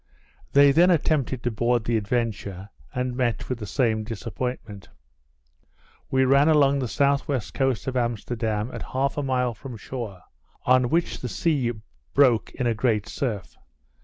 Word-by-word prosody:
They 140 0 +7
then 170 +6 +5
attempted 145 -7 +1
to 120 - 0
board 120 +1 +1
the 115 +1 0
Adventure, 105 -3 -2 0.2
and 125 0 -2
met 125 -3 -1
with 125 -2 -3
the 105 - -6
same 110 -4 +1
disappointment. 115 -1 -5 1.2
We 130 0 +3
ran 140 +3 +5
along 140 -3 +4
the 130 - -1
S.W. 140 +2 +1
coast 135 -4 0
of 130 - -3
Amsterdam 115 -1 -1
at - - -6
half 135 +1 -1
a 145 - -1
mile 125 -3 0
from 120 +2 -9
shore, 105 -6 -7 0.4
on 125 -1 +4
which 170 +4 0
the 125 - -5
sea 135 -7 0 0.4
broke 130 -5 +4
in 125 - -2
a 120 - +2
great 110 -2 0
surf. 105 - -4
125 Hz, 155 wpm, -25 LUFS, 115-135 Hz, 1.2 s, They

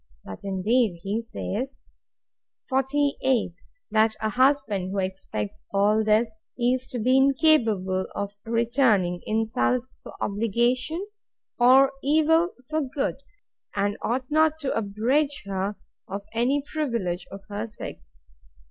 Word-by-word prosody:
But, 95 - -8
indeed, 200 0 +1
he 205 +4 -1
says, 245 +3 -4 0.9
48. 265 -5 +1 0.4
That 220 0 +3
a 220 - 0
husband, 255 -6 +2
who 200 - -4
expects 185 - -4
all 210 +2 +3
this, 215 +1 +2 0.2
is 255 +1 +1
to 255 - -5
be 255 +3 +3
incapable 230 - +3
of 200 0 -3
returning 230 -6 +2
insult 225 +3 +1 0.2
for - - -11
obligation, 240 - 0 0.5
or 265 +3 +6
evil 320 +4 +3
for 310 +2 0
good; 270 -1 -2 0.6
and 205 0 0
ought 255 +3 -1
not 315 0 +3
to 275 - -1
abridge 240 +8 0
her 195 +1 -2 0.3
of 200 +1 -5
any 255 +5 +1
privilege 230 - -2
of 195 - -8
her 210 +2 -4
sex. - - -10
230 Hz, 120 wpm, -25 LUFS, 200-270 Hz, 0.9 s, or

